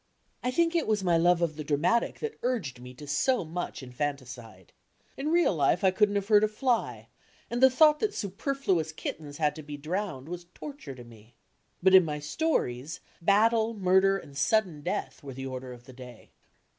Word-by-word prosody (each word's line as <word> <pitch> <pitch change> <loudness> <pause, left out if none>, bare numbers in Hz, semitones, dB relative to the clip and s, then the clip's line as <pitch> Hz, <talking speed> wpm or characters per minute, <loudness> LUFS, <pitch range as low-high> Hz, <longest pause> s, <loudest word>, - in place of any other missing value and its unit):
I 250 - -1
think 330 +6 +1
it 335 - +1
was 210 -3 +1
my 175 -2 +3
love 175 +1 +3
of 160 -2 -1
the 155 - -4
dramatic 155 +11 0
that 450 -1 -5
urged 215 - -2
me 125 0 -10
to 145 - -10
so 170 - +1
much 165 -3 -5
infanticide. 125 - -6 0.4
In 280 +3 -3
real 340 - +3
life 150 +4 +2
I 190 - +5
couldn't 205 +1 +2
have 200 -1 -1
hurt 210 -1 +5
a - - +4
fly, 235 +2 -1 0.4
and 240 +1 -2
the 265 - +8
thought 300 +3 +5
that 425 -1 -1
superfluous 195 - -1
kinens 150 -2 -6
had 150 -2 +1
to - - -6
be 145 -1 -8
drowned 155 -2 -4
was 175 0 -7
torture 275 - -8
to 125 - -11
me. 115 -1 -17 0.5
But 190 0 +5
in 190 -1 +9
my 150 -2 -3
stories 150 - -2 0.2
battle, 220 +4 +3
murder 190 0 +3
and 140 -7 -12
sudden 185 -3 +1
death - - -4
were 135 -3 -9
the 135 +1 -6
order 130 -1 -6
of 120 -1 -12
the 130 - -13
day. 125 -2 -13
175 Hz, 195 wpm, -28 LUFS, 140-220 Hz, 0.5 s, in